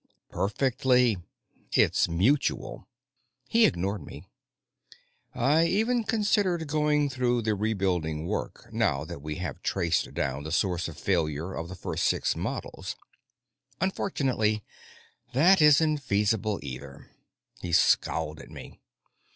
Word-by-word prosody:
"Perfectly. 125 Hz, +1 st, +2 dB, 0.6 s
It's -, -, +3 dB
mutual." 110 Hz, -, 0 dB, 0.6 s
He 230 Hz, -1 st, +5 dB
ignored 95 Hz, +1 st, -2 dB
me. 70 Hz, +1 st, -10 dB, 1.1 s
"I 145 Hz, +7 st, +3 dB
even 225 Hz, +5 st, +1 dB
considered 205 Hz, -6 st, +1 dB
going 150 Hz, -1 st, +2 dB
through 125 Hz, -2 st, 0 dB
with 120 Hz, -2 st, -2 dB
the 110 Hz, -, +2 dB
rebuilding 95 Hz, -7 st, -1 dB
work, 105 Hz, +4 st, -4 dB
now 95 Hz, -11 st, +1 dB
that 70 Hz, -, -8 dB
we 75 Hz, +1 st, -5 dB
have 90 Hz, -1 st, -5 dB
traced 85 Hz, -4 st, 0 dB
down 70 Hz, +1 st, -2 dB
the 80 Hz, +1 st, -6 dB
source 90 Hz, 0 st, 0 dB
of 85 Hz, -, -9 dB
failure 85 Hz, -1 st, -1 dB
of 85 Hz, -1 st, -5 dB
the 90 Hz, -, -7 dB
first -, -, -3 dB
six -, -, +1 dB
models. -, -, -5 dB, 0.8 s
Unfortunately, 130 Hz, -, 0 dB, 0.7 s
that 175 Hz, +7 st, +5 dB
isn't 150 Hz, 0 st, +5 dB
feasible, 105 Hz, -3 st, 0 dB
either." 70 Hz, 0 st, -9 dB, 0.5 s
He 90 Hz, -, -5 dB
scowled 80 Hz, -2 st, +2 dB
at 65 Hz, -, -12 dB
me. -, -, -11 dB
105 Hz, 120 wpm, -27 LUFS, -, 1.1 s, He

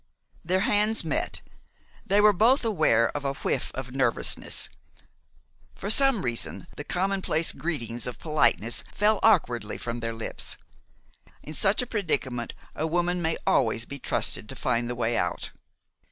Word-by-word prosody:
Their 185 Hz, +3 st, +1 dB
hands 210 Hz, +1 st, +2 dB
met. 160 Hz, -, -2 dB, 0.6 s
They 200 Hz, +2 st, +4 dB
were 210 Hz, 0 st, +6 dB
both 235 Hz, +7 st, +3 dB
aware 155 Hz, -, +2 dB
of 145 Hz, -, -3 dB
a 140 Hz, 0 st, -1 dB
whiff -, -, -1 dB
of 130 Hz, -1 st, -6 dB
nervousness. 130 Hz, -4 st, 0 dB, 1.1 s
For 200 Hz, -, -1 dB
some 270 Hz, -3 st, +4 dB
reason, 115 Hz, -5 st, -2 dB
the 145 Hz, -, -6 dB
commonplace 180 Hz, -2 st, 0 dB
greetings 120 Hz, -8 st, -4 dB
of 125 Hz, -, -5 dB
politeness 150 Hz, -7 st, +1 dB
fell 210 Hz, 0 st, +2 dB
awkwardly 125 Hz, -, +2 dB
from 120 Hz, 0 st, -4 dB
their 115 Hz, 0 st, -3 dB
lips. 115 Hz, 0 st, -3 dB, 0.9 s
In 155 Hz, -, -8 dB
such 195 Hz, +8 st, +4 dB
a -, -, -4 dB
predicament 140 Hz, -, -2 dB, 0.2 s
a 155 Hz, -, -1 dB
woman 175 Hz, +2 st, 0 dB
may 160 Hz, 0 st, 0 dB
always 115 Hz, -2 st, +2 dB
be 140 Hz, +3 st, -5 dB
trusted 105 Hz, -, +1 dB
to 135 Hz, -, -5 dB
find 120 Hz, -2 st, 0 dB
the 125 Hz, -, -2 dB
way 120 Hz, 0 st, 0 dB
out. -, -, -2 dB
155 Hz, 150 wpm, -26 LUFS, 120-195 Hz, 1.1 s, were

